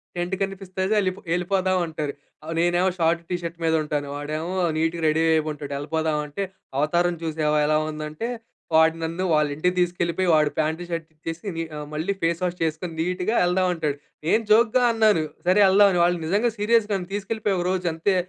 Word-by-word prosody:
Tent 175 Hz, +2 st, -2 dB
కనిపిస్తది 190 Hz, 0 st, -3 dB
యెల్‌పొ 185 Hz, -1 st, -1 dB
యెళ్ళిపోదాం 185 Hz, +1 st, +1 dB
అంటారు. 155 Hz, -3 st, -4 dB, 0.3 s
ఆహ్, 160 Hz, +1 st, -5 dB
నేనేమో 175 Hz, +2 st, +3 dB
షార్ట్, 165 Hz, +1 st, +2 dB
టీ 180 Hz, -, 0 dB
షర్ట్ 170 Hz, 0 st, -6 dB
మీద 160 Hz, -, +2 dB
ఉంటాను 145 Hz, -1 st, -2 dB
వాడేమో 155 Hz, +5 st, -4 dB, 0.2 s
నీట్‌గా 165 Hz, +1 st, 0 dB
రెడీ 155 Hz, +1 st, +2 dB
అయి 160 Hz, -, +3 dB
ఉంటాడు. 145 Hz, -1 st, -7 dB
యెళ్ళిపోదాం 155 Hz, +1 st, -1 dB
అంటే, 150 Hz, +7 st, -4 dB, 0.3 s
"అవతారం 170 Hz, +4 st, +2 dB
చూసావా 155 Hz, -1 st, 0 dB
ఎలా 155 Hz, 0 st, +3 dB
ఉందంటే" 155 Hz, +7 st, -5 dB, 0.5 s
వాడు 160 Hz, 0 st, +5 dB
నన్ను 165 Hz, +3 st, -2 dB
వాళ్ళ 150 Hz, -1 st, +3 dB
ఇంటికి 180 Hz, +4 st, 0 dB
తీసుకెళ్ళిపోయి 175 Hz, +1 st, 0 dB
వాడు 150 Hz, -1 st, +3 dB
ప్యాంటు, 160 Hz, +2 st, 0 dB
షర్ట్ 165 Hz, -2 st, -3 dB
ఇచ్చేసి 165 Hz, +5 st, -7 dB
ని 165 Hz, -, -2 dB
ఆహ్, 150 Hz, 0 st, -6 dB
మళ్ళీ 160 Hz, +6 st, -1 dB
ఫేస్ 170 Hz, +1 st, +1 dB
వాష్ 180 Hz, 0 st, -1 dB
చేసుకొని 160 Hz, +2 st, -2 dB
నీట్‌గా 180 Hz, +6 st, -1 dB
వెళ్దాం 180 Hz, +1 st, +2 dB
అంటాడు. 150 Hz, -3 st, -2 dB, 0.3 s
నేను 225 Hz, +5 st, +3 dB
జోక్‌గా 235 Hz, +3 st, +5 dB
అన్నాను, 215 Hz, -7 st, +3 dB, 0.2 s
"సరే 185 Hz, +3 st, +4 dB
యెళ్దాం" 200 Hz, +2 st, +6 dB
అని. 175 Hz, -, +1 dB
వాళ్ళు 175 Hz, 0 st, +1 dB
నిజంగా 205 Hz, +8 st, +1 dB
సీరియస్‌గా 210 Hz, -1 st, +2 dB, 0.2 s
తీసుకెళ్ళిపోయి 205 Hz, -1 st, -1 dB
ఒకరోజు 180 Hz, 0 st, -1 dB
అంతే 165 Hz, +4 st, +1 dB
170 Hz, 175 wpm, -24 LUFS, 155-190 Hz, 0.5 s, యెళ్దాం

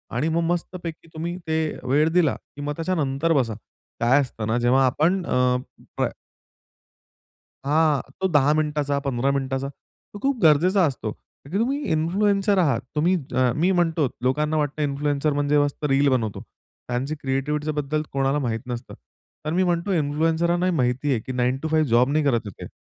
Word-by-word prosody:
आणि 145 Hz, +7 st, +1 dB
मग 165 Hz, +1 st, +1 dB
मस्तपैकी 170 Hz, -2 st, -5 dB
तुम्ही 170 Hz, +2 st, -4 dB
ते 160 Hz, 0 st, +1 dB, 0.3 s
वेळ 150 Hz, +4 st, +3 dB
दिला, 170 Hz, -5 st, +3 dB
की 145 Hz, -, -13 dB
मग 145 Hz, +1 st, -2 dB
त्याच्यानंतर 165 Hz, -2 st, 0 dB
बसा. 125 Hz, -7 st, +1 dB, 0.5 s
काय 125 Hz, +4 st, +4 dB
असतं 115 Hz, -5 st, -5 dB
ना, 110 Hz, +2 st, +1 dB
जेव्हा 125 Hz, +3 st, +3 dB
आपण 165 Hz, +9 st, +1 dB
अ 125 Hz, 0 st, +2 dB, 2.1 s
हां, 150 Hz, -1 st, +3 dB, 0.2 s
तो 190 Hz, -, +3 dB
10 145 Hz, 0 st, +4 dB
मिनिटाचा, 150 Hz, -2 st, 0 dB
15 135 Hz, +1 st, +1 dB
मिनिटाचा, 135 Hz, 0 st, -2 dB, 0.5 s
तो 205 Hz, -, -8 dB
खूप 275 Hz, -1 st, +1 dB
गरजेचा 175 Hz, +5 st, +5 dB
असतो. 130 Hz, -7 st, -3 dB, 0.3 s
कारण 140 Hz, -, -14 dB
की 190 Hz, -, 0 dB
तुम्ही 270 Hz, +6 st, 0 dB
इन्फ्लुएन्सर 195 Hz, +5 st, +2 dB
आहात. 140 Hz, -10 st, +2 dB
तुम्ही 170 Hz, +5 st, +3 dB, 0.2 s
अ, 130 Hz, -1 st, +3 dB
मी 170 Hz, +5 st, +2 dB
म्हणतो 165 Hz, -5 st, +2 dB, 0.2 s
लोकांना 150 Hz, +4 st, +1 dB
वाटतं 150 Hz, 0 st, -1 dB
इन्फ्लुएन्सर 145 Hz, +1 st, 0 dB
म्हणजे 145 Hz, +1 st, +1 dB
मस्त 145 Hz, +1 st, -1 dB
रील 135 Hz, +1 st, +3 dB
बनवतो. 115 Hz, -6 st, -1 dB, 0.5 s
त्यांची 130 Hz, +5 st, -2 dB
क्रिएटिव्हिटीच्या 150 Hz, +2 st, -2 dB
बद्दल 150 Hz, +2 st, -1 dB
कोणाला 135 Hz, +1 st, +1 dB
माहीत 115 Hz, -1 st, -1 dB
नसतं. 120 Hz, -1 st, -6 dB, 0.5 s
तर 155 Hz, -, -1 dB
मी 185 Hz, +2 st, +2 dB
म्हणतो 175 Hz, +2 st, 0 dB
इन्फ्लुएंसर्सना 165 Hz, +3 st, +1 dB
ही 185 Hz, -, +2 dB
माहिती 130 Hz, +1 st, 0 dB
आहे, 125 Hz, -, +1 dB
की 120 Hz, -, -7 dB
9 125 Hz, +1 st, 0 dB
टू -, -, 0 dB
5 155 Hz, -1 st, +3 dB
जॉब 120 Hz, +3 st, +4 dB
नाही 155 Hz, +1 st, +2 dB
करत 135 Hz, -5 st, +2 dB
आहेत 100 Hz, -, -9 dB
ते. -, -, -10 dB
150 Hz, 170 wpm, -23 LUFS, 135-165 Hz, 2.1 s, गरजेचा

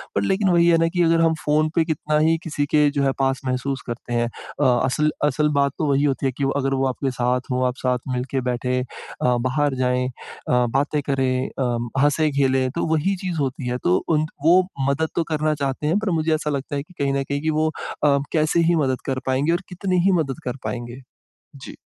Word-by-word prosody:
पर 100 Hz, -, +2 dB
लेकिन 190 Hz, -, +1 dB
वही 170 Hz, -1 st, +4 dB
है 170 Hz, -1 st, +5 dB
ना 165 Hz, 0 st, +2 dB
कि 175 Hz, -, +1 dB
अगर 165 Hz, 0 st, +3 dB
हम 165 Hz, -1 st, +4 dB
फ़ोन 155 Hz, +1 st, +2 dB
पे 165 Hz, -, +4 dB
कितना 155 Hz, -1 st, -1 dB
ही 160 Hz, +1 st, +3 dB
किसी 145 Hz, -3 st, -1 dB
के 150 Hz, -1 st, +5 dB
जो 140 Hz, -, +2 dB
है 135 Hz, -, +3 dB
पास 135 Hz, 0 st, +1 dB
महसूस 130 Hz, +1 st, -2 dB
करते 120 Hz, 0 st, -5 dB
हैं। 120 Hz, 0 st, +1 dB
अ, 130 Hz, +4 st, -6 dB, 0.2 s
असल 150 Hz, +4 st, +1 dB, 0.2 s
असल 150 Hz, +1 st, +1 dB
बात 140 Hz, 0 st, +3 dB
तो 155 Hz, -, -1 dB
वही 140 Hz, +1 st, +2 dB
होती 140 Hz, -1 st, 0 dB
है 135 Hz, -, +2 dB
कि 140 Hz, -, -5 dB
वो 135 Hz, -, +1 dB
अगर 135 Hz, +1 st, 0 dB
वो 135 Hz, 0 st, +1 dB
आपके 130 Hz, +1 st, -2 dB
साथ 125 Hz, +1 st, -1 dB
हो 130 Hz, 0 st, +1 dB
आप 125 Hz, -, -2 dB
साथ 125 Hz, -2 st, 0 dB
मिल 125 Hz, 0 st, -1 dB
के 135 Hz, -, 0 dB
बैठें 125 Hz, +1 st, -1 dB
अ, 125 Hz, 0 st, -2 dB
बाहर 140 Hz, +1 st, 0 dB
जाएँ 125 Hz, 0 st, 0 dB
अ, 125 Hz, 0 st, -2 dB
बातें 145 Hz, +1 st, 0 dB
करें 130 Hz, -1 st, +1 dB
अ, 120 Hz, 0 st, -2 dB
हँसे-खेलें 140 Hz, -3 st, +2 dB
तो 170 Hz, -, 0 dB
वही 160 Hz, +6 st, +1 dB
चीज़ 175 Hz, -3 st, -2 dB
होती 135 Hz, -2 st, -2 dB
है, 125 Hz, 0 st, -1 dB
तो 90 Hz, -7 st, +2 dB
उन 155 Hz, -1 st, +2 dB, 0.2 s
वो 175 Hz, +3 st, +7 dB, 0.3 s
मदद 155 Hz, +3 st, 0 dB
तो 170 Hz, -, +1 dB
करना 155 Hz, 0 st, +1 dB
चाहते 135 Hz, +2 st, -2 dB
हैं 165 Hz, +6 st, +2 dB
पर 215 Hz, -2 st, -2 dB
मुझे 160 Hz, 0 st, +1 dB
ऐसा 150 Hz, -1 st, -3 dB
लगता 140 Hz, 0 st, -3 dB
है 140 Hz, -, -2 dB
कि 170 Hz, -, -20 dB
कहीं 140 Hz, -1 st, +1 dB
न 140 Hz, 0 st, 0 dB
कहीं 140 Hz, +1 st, -3 dB
कि 160 Hz, -, -1 dB
वो 155 Hz, 0 st, +1 dB, 0.4 s
अ, 140 Hz, -1 st, +4 dB
कैसे 155 Hz, +1 st, +2 dB
ही 170 Hz, -, +4 dB
मदद 130 Hz, -1 st, -1 dB
कर 130 Hz, -1 st, -1 dB
पाएँगे 135 Hz, +4 st, +1 dB
और 175 Hz, +2 st, 0 dB
कितनी 180 Hz, 0 st, -1 dB
ही 195 Hz, -, +5 dB
मदद 135 Hz, -1 st, -4 dB
कर 125 Hz, +1 st, -3 dB
पाएँगे? 120 Hz, +1 st, -5 dB, 0.5 s
जी। 135 Hz, -, -10 dB
140 Hz, 235 wpm, -22 LUFS, 130-155 Hz, 0.5 s, वो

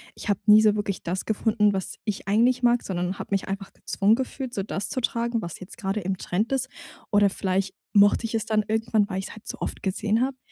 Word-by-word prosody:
ich -, -, -7 dB
habe 200 Hz, -, +2 dB
nie 215 Hz, 0 st, +8 dB
so 215 Hz, -1 st, +4 dB
wirklich 205 Hz, -2 st, -3 dB
das 180 Hz, +2 st, -2 dB
gefunden, 215 Hz, -1 st, +2 dB
was 190 Hz, -1 st, -3 dB
ich 210 Hz, -3 st, -3 dB
eigentlich 245 Hz, +4 st, +3 dB
mag, 240 Hz, 0 st, +4 dB
sondern 180 Hz, 0 st, -3 dB
habe -, -, -7 dB
mich 195 Hz, -1 st, 0 dB
einfach 195 Hz, 0 st, -5 dB
gezwungen 205 Hz, +3 st, +2 dB
gefühlt, 260 Hz, 0 st, -4 dB
so 195 Hz, -, -2 dB
das 195 Hz, 0 st, -3 dB
zu 260 Hz, -, -3 dB
tragen, 235 Hz, 0 st, 0 dB
was 170 Hz, -4 st, -6 dB
jetzt 185 Hz, -, -10 dB
gerade 200 Hz, -2 st, -2 dB
im 190 Hz, -1 st, -2 dB
Trend 210 Hz, +8 st, -1 dB
ist. 260 Hz, -1 st, 0 dB, 0.4 s
Oder 205 Hz, -1 st, +5 dB
vielleicht 190 Hz, 0 st, -1 dB, 0.2 s
mochte 205 Hz, +2 st, +5 dB
ich 225 Hz, -, -4 dB
es 220 Hz, -2 st, 0 dB
dann 215 Hz, -1 st, +1 dB
irgendwann, 220 Hz, -1 st, +1 dB
weil 190 Hz, -, -2 dB
ich 190 Hz, -, -4 dB
es -, -, -10 dB
halt 215 Hz, -, -14 dB
so -, -, -4 dB
oft -, -, -4 dB
gesehen 210 Hz, +3 st, 0 dB
habe. 265 Hz, 0 st, -2 dB
210 Hz, 240 wpm, -25 LUFS, 195-230 Hz, 0.4 s, nie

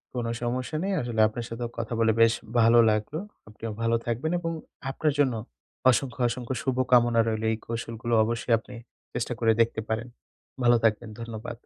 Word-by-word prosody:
কোনো 120 Hz, -2 st, -2 dB
সমস্যা 125 Hz, +5 st, -2 dB
নেই, 195 Hz, -, -1 dB
আসলে 120 Hz, -2 st, -3 dB
আপনার 115 Hz, +2 st, -5 dB
সাথেও 115 Hz, 0 st, -4 dB
কথা 115 Hz, 0 st, -3 dB
বলে 110 Hz, -1 st, +4 dB
বেশ 115 Hz, 0 st, +6 dB, 0.3 s
ভালো 115 Hz, +1 st, +6 dB
লাগলো। 110 Hz, +9 st, -2 dB, 0.3 s
আপনিও 110 Hz, +1 st, -7 dB
ভালো 115 Hz, 0 st, +2 dB
থাকবেন 120 Hz, +8 st, -1 dB
এবং 165 Hz, -1 st, -3 dB, 0.4 s
আপনার 150 Hz, +2 st, 0 dB
জন্য 130 Hz, -4 st, +3 dB, 0.6 s
অসংখ্য, 125 Hz, 0 st, -1 dB
অসংখ্য 125 Hz, +1 st, -4 dB
শুভকামনা 125 Hz, -3 st, +3 dB
রইলো। 110 Hz, 0 st, -1 dB
এই 110 Hz, -, -1 dB
কৌশলগুলো 115 Hz, 0 st, -4 dB
অবশ্যই 115 Hz, +1 st, 0 dB
আপনি 125 Hz, +2 st, -12 dB, 0.4 s
চেষ্টা -, -, -2 dB
করে 115 Hz, -, +4 dB
দেখতে 110 Hz, -1 st, +1 dB
পারেন। 110 Hz, +2 st, -2 dB, 0.6 s
ভালো 120 Hz, 0 st, +6 dB
থাকবেন, 110 Hz, +1 st, +1 dB
ধন্যবাদ। 115 Hz, +1 st, -7 dB
115 Hz, 165 wpm, -27 LUFS, 115-125 Hz, 0.6 s, বেশ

